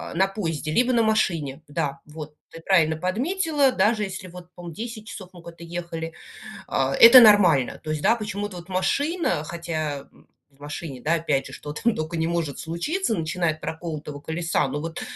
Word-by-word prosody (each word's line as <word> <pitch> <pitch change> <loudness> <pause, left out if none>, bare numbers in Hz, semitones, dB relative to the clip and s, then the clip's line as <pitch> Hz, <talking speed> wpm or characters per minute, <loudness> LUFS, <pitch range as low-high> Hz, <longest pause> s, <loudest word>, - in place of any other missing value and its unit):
на 190 +2 +3
поезде, 160 -6 -3
либо 250 +8 +2
на 230 -1 +3
машине, 165 -10 0
да, 140 -1 -3
вот, 150 0 -9 0.2
ты 165 - -11
правильно 160 -4 +3
подметила. 275 - +1
Даже 215 -2 +2
если 190 -1 -6
вот, 180 0 -12
по-моему, 175 -2 -9
10 225 +1 -7
часов 190 -3 -9
мы 175 - -13
куда-то 170 0 -11
ехали, 165 -1 -5 0.6
а, 135 0 0
это 235 +2 +10
нормально. 185 - +5
То - - -10
есть, 155 -1 -2
да, 235 - +4
почему-то 205 -3 -5
вот 175 +2 -12
машина, 285 - 0
хотя, 155 -4 -4
м, - - -23 0.2
в 140 0 -30
машине, 145 -2 -7
да, 160 +3 +2
опять 150 -5 0
же, - - -10
что 145 - -7
там 225 +9 0
только 155 +2 -3
не 160 0 0
может 170 -5 -2
случиться, 225 - -2
начиная 165 0 -1
от 155 - -18
проколотого 155 -3 -6
колеса, 165 +3 -1
ну, 145 - -3
вот, 165 +1 -5
170 Hz, 185 wpm, -24 LUFS, 155-205 Hz, 0.6 s, это